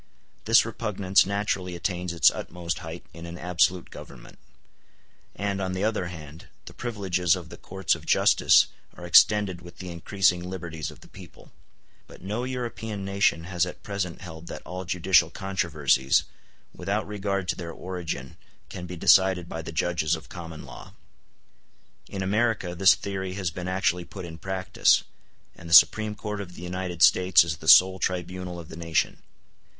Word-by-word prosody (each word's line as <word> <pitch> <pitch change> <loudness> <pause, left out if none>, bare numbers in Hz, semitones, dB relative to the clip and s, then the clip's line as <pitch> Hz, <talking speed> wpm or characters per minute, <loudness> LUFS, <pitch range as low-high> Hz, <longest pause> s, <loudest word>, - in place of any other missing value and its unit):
This - - +5
repugnance 95 0 +1
naturally 100 -3 -2
attains 90 0 -3
its 85 - +5
utmost 85 -1 -5
height 80 +2 -8
in 85 0 -9
an 85 +1 -8
absolute 90 0 0
Government; - - -12 1.0
and, 100 -1 -2
on 95 -1 -2
the 95 +2 -2
other 105 -4 0
hand, 80 -2 -10 0.2
the - - -11
privileges 95 -7 0
of - - -9
the - - -10
courts 95 -1 -1
of - - -6
justice - - +5 0.3
are 90 - -9
extended 95 0 +4
with 85 0 -13
the 90 -1 -7
increasing 90 +1 0
liberties 85 -5 -5
of - - -14
the - - -15
people: - - -15 0.6
but - - -15
no 105 +6 -3
European 110 -5 -5
nation 100 -4 +1
has 90 0 -1
at 90 - -5
present 100 -5 -4
held 85 -2 -10
that - - -8
all 90 +1 -6
judicial 90 -1 +3
controversies, 80 -8 +1 0.5
without 105 +2 -2
regard 100 -2 -3
to - - +1
their 85 -2 -7
origin, 85 -7 -6 0.3
can 90 - -7
be 90 - -7
decided 95 0 +4
by 80 - -5
the 80 - -7
judges 85 -1 0
of 80 0 -12
common 85 -3 -9
law. - - -12 1.2
In 95 -1 -4
America 105 -2 0
this 95 +2 +5
theory 95 -2 -5
has 95 -3 -3
been 90 +2 -6
actually 90 -1 0
put 95 -1 -9
in 80 -1 -9
practice, 95 -1 +2 0.5
and 85 - -12
the 85 - +7
Supreme 110 +2 +6
Court 105 -1 -5
of 90 -3 -10
the 90 - -10
United 90 -1 -2
States 90 -2 +6
is 80 -2 -4
the - - -11
sole 95 0 +7
tribunal 90 0 -3
of 85 - -11
the - - -9
nation. 85 -1 -1
90 Hz, 165 wpm, -26 LUFS, 85-95 Hz, 1.2 s, the